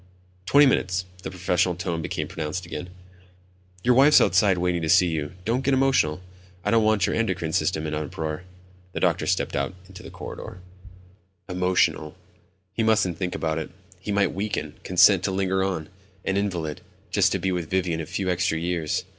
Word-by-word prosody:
"Twenty 145 +1 +6
minutes." 95 -8 +1 0.2
The - - -5
professional 90 -1 0
tone 85 -2 -3
became - - -3
pronounced 80 +3 -4
again. 85 +1 -6 0.9
"Your 125 - +4
wife's 140 +4 +7
outside 95 0 +3
waiting 90 -1 0
to 80 - -2
see 90 +1 +6
you. 75 -2 -3
Don't 120 +5 0
get 135 +1 +2
emotional, 130 - +2 0.4
I 105 - +1
don't 115 -1 +4
want 110 -3 +3
your - - -1
endocrine 90 -8 -1
system 80 0 0
in 75 - -3
an 75 0 -2
uproar." 80 +2 -4 0.5
The - - -3
doctor - - +1
stepped - - 0
out 70 +6 -2
into 95 -1 -12
the - - -10
corridor. - - -8 0.9
Emotional. 90 -4 +1 0.6
He 115 - -1
mustn't 110 -6 +2
think 90 -2 -2
about 80 0 -1
it. 80 - -5 0.3
He 100 +3 -5
might 100 -1 +2
weaken, 95 -6 -3
consent 95 +1 +5
to 95 - 0
linger 95 0 0
on, 90 -5 -2 0.4
an 95 - 0
invalid, 90 -7 -2 0.3
just - - +3
to - - +1
be 95 - -1
with 90 -3 -3
Vivian 90 -3 0
a 75 - -7
few 95 - -3
extra 90 -2 +1
years. 85 -2 -1
90 Hz, 180 wpm, -25 LUFS, 80-100 Hz, 0.9 s, wife's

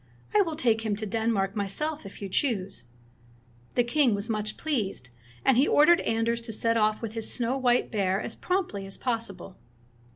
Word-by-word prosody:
I 420 - +7
will 330 -5 -1
take 230 -7 +2
him 220 -2 -1
to 215 +1 -3
Denmark 210 -2 0
myself, 220 +7 -2
if 200 - -11
you - - -3
choose." 195 - -1 0.9
The 245 - +4
king 245 -2 +2
was 200 +3 -3
much 215 -1 -1
pleased, 205 - -3 0.3
and 265 -3 +4
he 270 - +4
ordered 310 +4 +5
Anders 230 +1 0
to 230 -1 -3
set 230 +1 +1
off 215 0 +1
with 220 -1 -4
his 225 -1 +1
snow 245 +1 +1
white 250 -2 +1
bear 195 -3 +1
as 220 - -3
promptly 355 - -2
as 195 - -2
possible. 225 -6 -3
225 Hz, 185 wpm, -27 LUFS, 200-255 Hz, 0.9 s, I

